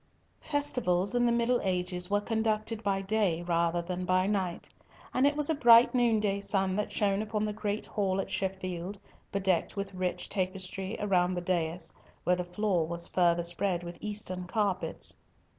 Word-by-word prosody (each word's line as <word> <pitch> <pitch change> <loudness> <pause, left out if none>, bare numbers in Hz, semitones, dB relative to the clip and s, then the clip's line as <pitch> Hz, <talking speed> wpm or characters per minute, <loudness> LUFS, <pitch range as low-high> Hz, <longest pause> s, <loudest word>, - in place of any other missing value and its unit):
Festivals 245 - 0
in 245 0 +3
the - - +3
middle 235 +1 +2
ages 180 -1 -1
were 205 0 +3
conducted 220 0 -1
by 195 -2 0
day 195 -5 +1
rather 170 0 +1
than 180 +1 -4
by 185 +1 +2
night, 190 -4 -1 0.5
and 260 +2 +4
it 290 +1 0
was 300 -1 +2
a 320 - +3
bright 240 -4 +7
noonday 220 -5 +2
sun 190 -2 0
that 210 +1 -2
shone 200 -1 +1
upon 215 0 -1
the 210 - -2
great 210 0 -2
hall 195 -2 -1
at 195 - -3
Sheffield, 190 0 -3 0.3
bedecked 190 -2 0
with 200 -1 -4
rich 180 -1 -2
tapestry 190 +1 -3
around 185 -3 +2
the 175 - -2
dais, 175 -2 -1 0.3
where 180 - +3
the 180 - -2
floor 180 -2 0
was 170 0 0
further 175 -1 +2
spread 175 +1 0
with 175 0 -8
Eastern 205 -4 -3
carpets. 200 -2 -1
195 Hz, 170 wpm, -30 LUFS, 180-215 Hz, 0.5 s, bright